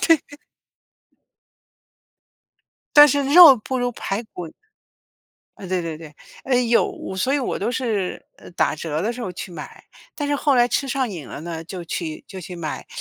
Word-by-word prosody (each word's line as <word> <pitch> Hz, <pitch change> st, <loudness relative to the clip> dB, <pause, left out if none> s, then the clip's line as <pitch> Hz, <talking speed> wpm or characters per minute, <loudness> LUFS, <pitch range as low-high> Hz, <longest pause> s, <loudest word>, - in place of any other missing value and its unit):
对 330 Hz, -, +6 dB
对。 290 Hz, -, -16 dB, 2.6 s
但 295 Hz, 0 st, +11 dB
是 285 Hz, +1 st, +1 dB
肉 295 Hz, -1 st, +9 dB
不 260 Hz, +4 st, -4 dB
如 245 Hz, 0 st, 0 dB
排 205 Hz, -1 st, -4 dB
骨。 180 Hz, -6 st, -9 dB, 1.1 s
呃， 195 Hz, -, -9 dB
对 185 Hz, -1 st, -1 dB
对 160 Hz, -2 st, -5 dB
对， 155 Hz, -2 st, -12 dB, 0.3 s
呃， 265 Hz, -, 0 dB
有 245 Hz, -, 0 dB
所 260 Hz, +9 st, 0 dB
以 -, -, +2 dB
我 255 Hz, -, -2 dB
都 -, -, -2 dB
是 220 Hz, -7 st, -2 dB
呃， -, -, -14 dB
打 170 Hz, -, 0 dB
折 155 Hz, 0 st, -3 dB
的 225 Hz, +4 st, -1 dB
时 245 Hz, -, -9 dB
候 190 Hz, -6 st, -4 dB
去 180 Hz, -, -8 dB
买， 155 Hz, -4 st, -10 dB, 0.3 s
但 290 Hz, -, -3 dB
是 285 Hz, -, +1 dB
后 285 Hz, -1 st, +2 dB
来 240 Hz, -1 st, +4 dB
吃 275 Hz, -, 0 dB
上 260 Hz, -3 st, -1 dB
瘾 165 Hz, -8 st, -7 dB
了 -, -, -8 dB
呢， 165 Hz, 0 st, -6 dB
就 175 Hz, 0 st, -7 dB
去 160 Hz, -2 st, -5 dB
就 190 Hz, -, -8 dB
去 180 Hz, +1 st, -8 dB
买， 160 Hz, -3 st, -6 dB
210 Hz, 195 characters per minute, -22 LUFS, 170-265 Hz, 2.6 s, 但